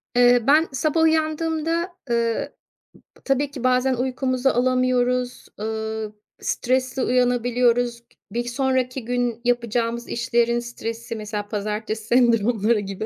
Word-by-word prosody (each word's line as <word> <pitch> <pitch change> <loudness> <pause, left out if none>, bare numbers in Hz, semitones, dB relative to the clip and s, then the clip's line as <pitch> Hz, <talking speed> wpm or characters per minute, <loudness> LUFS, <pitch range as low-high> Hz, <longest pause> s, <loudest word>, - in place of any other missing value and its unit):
Eee, 245 0 +6
ben 310 +4 +5
sabah 310 +4 0
uyandığımda, 320 +2 0 0.2
ııı, 230 -1 0 0.7
ıp - - -28
tabii 275 +1 +1
ki 265 -3 -8
bazen 255 +1 +3
uykumuzu 255 +1 0
alamıyoruz, 250 0 +1
ııı, 220 0 -3 0.3
stresli 255 +1 0
uyanabiliyoruz. 245 -1 +2
K 235 - -40 0.3
bir 240 +2 -1
sonraki 255 0 -1
gün 245 -1 -1
yapacağımız 235 -1 0
işlerin 235 0 +1
stresi, 230 -1 -6
mesela 210 -1 -5
pazartesi 215 +1 -3
sendromları 230 -2 +3
gibi, 195 +1 -5
245 Hz, 115 wpm, -23 LUFS, 230-255 Hz, 0.7 s, Eee